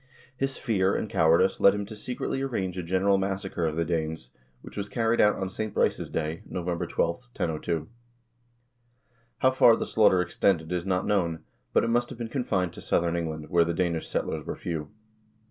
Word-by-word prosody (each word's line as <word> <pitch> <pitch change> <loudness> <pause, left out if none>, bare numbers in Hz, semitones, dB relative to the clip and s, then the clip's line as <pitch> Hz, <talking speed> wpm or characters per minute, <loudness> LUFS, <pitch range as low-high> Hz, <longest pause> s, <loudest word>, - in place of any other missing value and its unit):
His 135 +1 -1
fear 100 -4 +1
and - - -1
cowardice 80 -3 +3
led 100 - +6
him 105 0 -3
to 110 - -9
secretly 125 +4 -3
arrange 100 -9 -2
a 90 - -3
general 95 +3 +2
massacre 95 -3 -2
of 75 - -2
the 85 0 0
Danes, 80 -5 -3 0.3
which - - -11
was 100 0 -4
carried 115 +2 +2
out 105 0 +5
on 95 - -3
St. 105 +3 -5
Brice's - - +1
Day 80 +1 -3
(Nov. 90 -2 -5
12), 85 -1 -3 0.2
1002. 85 -9 -3 1.5
How 130 - +4
far 120 -3 +6
the - - -3
slaughter 105 -4 +4
extended, 90 -2 +1
is 90 +1 -2
not 90 -1 +1
known, 85 -6 0 0.3
but - - +3
it 115 - 0
must 120 +1 +1
have - - -8
been 115 -1 -5
confined 95 - -1
to - - -10
southern 85 0 +1
England, 80 -2 -4
where 85 -1 +5
the 85 0 -2
Danish 85 -3 -1
settlers - - -2
were - - -5
few. 80 -3 -4
95 Hz, 190 wpm, -27 LUFS, 85-105 Hz, 1.5 s, led